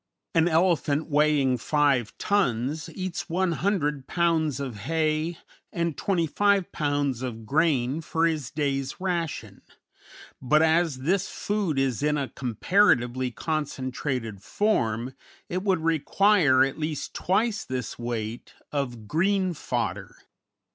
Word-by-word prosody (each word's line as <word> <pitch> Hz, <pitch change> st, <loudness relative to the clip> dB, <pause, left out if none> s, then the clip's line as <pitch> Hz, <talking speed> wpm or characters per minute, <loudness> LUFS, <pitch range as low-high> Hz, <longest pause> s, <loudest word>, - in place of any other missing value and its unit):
] -, -, -60 dB
An 165 Hz, +1 st, +4 dB
elephant 165 Hz, -3 st, +2 dB
weighing 145 Hz, -4 st, +3 dB
5 140 Hz, -4 st, +1 dB
tons 150 Hz, -, 0 dB
eats 185 Hz, -1 st, -4 dB
100 170 Hz, -5 st, 0 dB
pounds 160 Hz, -5 st, +1 dB
of 130 Hz, -6 st, -5 dB
hay 155 Hz, -, -1 dB, 0.3 s
and 170 Hz, -3 st, -1 dB
25 195 Hz, +2 st, +1 dB
pounds 145 Hz, -4 st, -1 dB
of 115 Hz, -4 st, -5 dB
grain 145 Hz, 0 st, +1 dB
for 165 Hz, +1 st, 0 dB
his 155 Hz, -7 st, -1 dB
day's 135 Hz, -2 st, -2 dB
ration; 175 Hz, -4 st, -3 dB, 0.8 s
but, 150 Hz, +5 st, +4 dB
as 160 Hz, -4 st, +2 dB
this 185 Hz, +7 st, +1 dB
food 205 Hz, -8 st, -2 dB
is 135 Hz, -3 st, 0 dB
in 150 Hz, 0 st, +1 dB
a 140 Hz, -2 st, -2 dB
comparatively 130 Hz, -, +2 dB
concentrated 130 Hz, -, -3 dB
form, 125 Hz, -, 0 dB, 0.4 s
it 180 Hz, +1 st, -2 dB
would 190 Hz, -4 st, +1 dB
require 165 Hz, -2 st, +4 dB
at 135 Hz, +3 st, -2 dB
least 155 Hz, -1 st, -3 dB
twice 220 Hz, +4 st, 0 dB
this 125 Hz, -3 st, -5 dB
weight 120 Hz, -1 st, -5 dB, 0.2 s
of 120 Hz, -7 st, -3 dB
green 185 Hz, -, +1 dB
fodder. -, -, -3 dB
150 Hz, 120 wpm, -26 LUFS, 130-170 Hz, 0.8 s, An